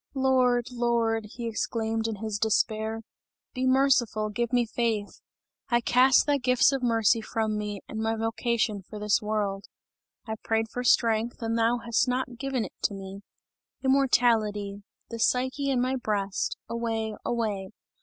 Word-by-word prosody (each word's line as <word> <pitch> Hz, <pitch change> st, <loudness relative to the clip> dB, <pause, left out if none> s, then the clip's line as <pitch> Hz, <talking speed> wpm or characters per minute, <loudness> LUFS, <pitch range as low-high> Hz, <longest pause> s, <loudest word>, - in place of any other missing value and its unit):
"Lord! 255 Hz, -2 st, +2 dB
Lord!" 235 Hz, -2 st, 0 dB
he 235 Hz, 0 st, -5 dB
exclaimed 225 Hz, 0 st, -2 dB
in 225 Hz, -, -3 dB
his 210 Hz, 0 st, -4 dB
despair, 220 Hz, +1 st, 0 dB, 0.5 s
"be 260 Hz, -1 st, -1 dB
merciful, 255 Hz, -5 st, +2 dB
give 235 Hz, +3 st, -2 dB
me 245 Hz, -1 st, +3 dB
faith! 225 Hz, -2 st, -2 dB, 0.5 s
I 240 Hz, -, +3 dB
cast 250 Hz, +2 st, +4 dB
thy 290 Hz, -1 st, +2 dB
gifts 250 Hz, +1 st, +4 dB
of 270 Hz, -1 st, -1 dB
mercy 225 Hz, -2 st, +3 dB
from 220 Hz, -1 st, -2 dB
me 210 Hz, -1 st, -4 dB
and 220 Hz, -, -6 dB
my 225 Hz, 0 st, 0 dB
vocation 225 Hz, -1 st, -1 dB
for 210 Hz, +3 st, -10 dB
this 210 Hz, 0 st, +1 dB
world! 205 Hz, -2 st, -2 dB, 0.6 s
I 220 Hz, -1 st, -4 dB
prayed 225 Hz, 0 st, 0 dB
for 245 Hz, -, -3 dB
strength 230 Hz, -1 st, +2 dB
and 225 Hz, 0 st, -1 dB
thou 230 Hz, +1 st, +2 dB
hast 235 Hz, +2 st, +2 dB
not 250 Hz, -1 st, -2 dB
given 265 Hz, -3 st, -1 dB
it -, -, -10 dB
to 200 Hz, -, 0 dB
me. 195 Hz, 0 st, -8 dB, 0.6 s
Immortality! 225 Hz, -7 st, +2 dB, 0.3 s
The 230 Hz, -, -5 dB
Psyche 260 Hz, +4 st, +1 dB
in 260 Hz, -2 st, +1 dB
my 255 Hz, +2 st, 0 dB
breast 205 Hz, -5 st, -2 dB
away! 225 Hz, -1 st, -2 dB
away! 215 Hz, -5 st, -2 dB
225 Hz, 155 wpm, -27 LUFS, 215-245 Hz, 0.6 s, cast